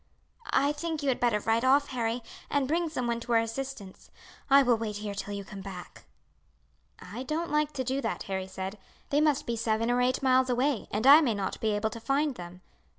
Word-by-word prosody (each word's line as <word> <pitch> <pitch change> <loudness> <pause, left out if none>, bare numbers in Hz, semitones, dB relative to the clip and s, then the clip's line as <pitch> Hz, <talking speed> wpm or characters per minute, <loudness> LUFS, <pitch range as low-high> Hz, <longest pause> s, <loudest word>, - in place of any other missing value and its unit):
"I 285 +1 +3
think 310 0 -4
you 280 - +1
had 255 - 0
better 235 -4 +2
ride 225 +2 +1
off, 275 +2 +4
Harry, 235 -1 -2 0.3
and 285 -2 +1
bring 335 +3 0
some 255 -5 -3
one 235 0 -1
to 235 0 -3
our 230 - +6
assistance. 230 -3 -6 0.4
I 275 0 +7
will 245 -2 +4
wait 220 -2 -4
here 205 0 -4
till 200 0 -5
you 200 -1 -6
come 195 -1 -9
back." 190 -2 -10 0.9
"I 210 +7 -8
don't 315 +6 -3
like 300 0 +1
to 260 - -2
do 265 +2 -1
that," 225 - -3
Harry 190 -1 -4
said. 190 +2 -6 0.3
"They 290 +1 +3
must 300 -3 +2
be 235 - -2
seven 230 +1 0
or 245 0 +2
eight 255 +2 +1
miles 260 0 +4
away, 255 0 0
and 215 +3 -2
I 290 +4 +9
may 240 -8 +1
not 195 -2 -4
be 220 - +1
able 210 +1 -1
to 230 - -7
find 275 +5 0
them. 180 -3 -10
240 Hz, 220 wpm, -28 LUFS, 210-275 Hz, 0.9 s, I